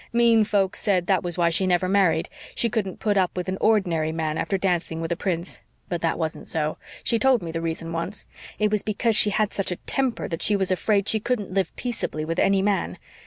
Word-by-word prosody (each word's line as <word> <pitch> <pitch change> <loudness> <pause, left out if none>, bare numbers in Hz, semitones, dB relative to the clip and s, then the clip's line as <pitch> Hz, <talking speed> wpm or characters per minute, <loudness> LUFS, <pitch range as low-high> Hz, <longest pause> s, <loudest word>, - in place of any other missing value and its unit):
Mean 235 -1 +5
folks 200 -2 +1
said 190 -5 +1
that 190 -2 +2
was 175 -1 -2
why 170 -1 +3
she 185 +3 +1
never 180 0 +2
married 180 -4 +2 0.3
she 235 - 0
couldn't 205 -5 -2
put 205 -2 +1
up 185 -1 +1
with 180 0 -2
an 185 +1 -3
ordinary 175 -8 +2
man 160 -1 -2
after 180 +4 -1
dancing 175 -3 -1
with 165 +1 -3
a - - +2
prince. 175 -1 -2 0.3
But 175 -3 -2
that 165 - 0
wasn't 160 -2 -4
so. 155 -1 -2 0.2
She 230 - +1
told 260 -5 +3
me 165 - -4
the 165 0 -3
reason 165 0 -3
once 170 +5 -3 0.3
it 210 -1 +1
was 210 -1 +1
because 220 +1 0
she 210 - +5
had 205 0 0
such 195 - -1
a - - -1
temper 260 -4 -1
that 165 -2 -4
she 210 - +3
was 190 -2 +1
afraid 200 +2 +1
she 220 - +2
couldn't 215 -4 -2
live 190 -3 0
peaceably 220 -10 -3
with 165 +2 -2
any 195 -1 +3
man. 200 -1 0
190 Hz, 230 wpm, -24 LUFS, 165-210 Hz, 0.3 s, Mean